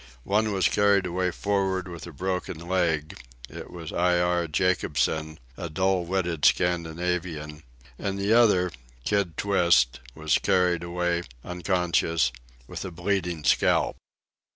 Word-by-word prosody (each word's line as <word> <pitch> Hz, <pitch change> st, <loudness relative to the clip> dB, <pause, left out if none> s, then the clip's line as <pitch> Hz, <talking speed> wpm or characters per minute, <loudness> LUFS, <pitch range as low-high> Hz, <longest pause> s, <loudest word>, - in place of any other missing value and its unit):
One 105 Hz, +5 st, +1 dB
was 95 Hz, -3 st, +2 dB
carried 100 Hz, -2 st, +3 dB
away 90 Hz, +1 st, 0 dB
for'ard 95 Hz, -1 st, -1 dB
with 85 Hz, -1 st, -8 dB
a -, -, -8 dB
broken 90 Hz, +2 st, -3 dB
leg—it 75 Hz, -9 st, -3 dB
was 85 Hz, -2 st, -8 dB
Iare 90 Hz, -1 st, +2 dB
Jacobson, 80 Hz, -2 st, 0 dB, 0.2 s
a 85 Hz, -, -5 dB
dull 95 Hz, +2 st, +1 dB
witted 85 Hz, -4 st, -2 dB
Scandinavian; 85 Hz, -3 st, 0 dB, 0.4 s
and 100 Hz, -1 st, -2 dB
the 100 Hz, +2 st, +1 dB
other, 105 Hz, -7 st, +4 dB, 0.3 s
Kid 100 Hz, -5 st, 0 dB
Twist, 85 Hz, -10 st, +3 dB, 0.2 s
was -, -, +1 dB
carried 90 Hz, -2 st, +2 dB
away, 85 Hz, 0 st, -1 dB, 0.2 s
unconscious, 90 Hz, -4 st, 0 dB, 0.3 s
with -, -, -7 dB
a -, -, -5 dB
bleeding 90 Hz, -2 st, -2 dB
scalp. -, -, +2 dB
90 Hz, 120 wpm, -26 LUFS, 85-95 Hz, 0.4 s, other